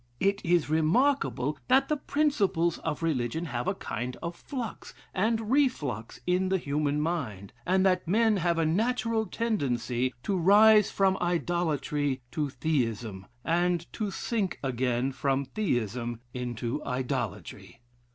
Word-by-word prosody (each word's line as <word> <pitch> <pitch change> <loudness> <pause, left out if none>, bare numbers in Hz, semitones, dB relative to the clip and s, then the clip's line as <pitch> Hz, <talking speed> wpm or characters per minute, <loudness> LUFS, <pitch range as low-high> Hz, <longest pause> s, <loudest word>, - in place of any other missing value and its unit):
It 200 +1 +1
is 170 -2 +2
remarkable, 155 - +1
that 270 +1 +4
the 305 - +1
principles 210 - +1
of 160 0 -3
religion 155 0 -1
have 125 -5 -3
a - - +1
kind 120 +3 -4
of 170 0 -4
flux 245 0 -6 0.2
and 220 +3 0
reflux 150 - 0
in 180 +1 +1
the 190 - +2
human 145 -2 -1
mind, 135 - -3
and 190 +1 +3
that 185 -2 +2
men 220 +3 +3
have 170 -2 +1
a 165 - +2
natural 225 +5 +1
tendency 130 - -1
to 200 - 0
rise 210 +4 +6
from 190 -1 +2
idolatry 155 -6 0
to 150 -2 -1
Theism, 115 - -2 0.2
and 175 0 +1
to 215 -3 -2
sink 200 -1 -2
again 125 0 0
from 135 +1 0
Theism 120 - -2
into 125 +2 -3
idolatry. 125 -2 -4
165 Hz, 130 wpm, -28 LUFS, 130-200 Hz, 0.2 s, rise